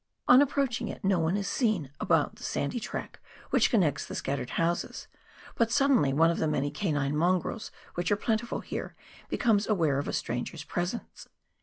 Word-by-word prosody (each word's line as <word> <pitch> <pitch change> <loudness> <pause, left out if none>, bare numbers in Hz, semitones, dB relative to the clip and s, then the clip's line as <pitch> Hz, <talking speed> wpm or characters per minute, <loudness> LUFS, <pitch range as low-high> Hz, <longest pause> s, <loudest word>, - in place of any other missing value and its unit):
On 255 +2 +8
approaching 265 -4 0
it - - -7
no 190 -2 +3
one 165 +4 +1
is 200 - -2
seen 210 - 0
about - - +1
the - - -12
sandy 140 - -2
track 230 - -6 0.3
which - - +4
connects 175 - +2
the - - -7
scattered 135 -2 -3
houses, 170 +1 -1 0.5
but 230 -1 +1
suddenly 270 - +4
one 165 +4 +4
of 170 - -3
the 160 - +1
many 145 -1 0
canine 145 -7 -1
mongrels 180 +6 0 0.2
which 175 +2 -2
are - - +5
plentiful 225 +2 -1
here, - - -6 0.3
becomes 220 -5 +2
aware 160 -10 +2
of 145 - -3
a - - -3
stranger's 120 +5 -3
presence. 175 +8 -4
180 Hz, 175 wpm, -29 LUFS, 150-230 Hz, 0.5 s, On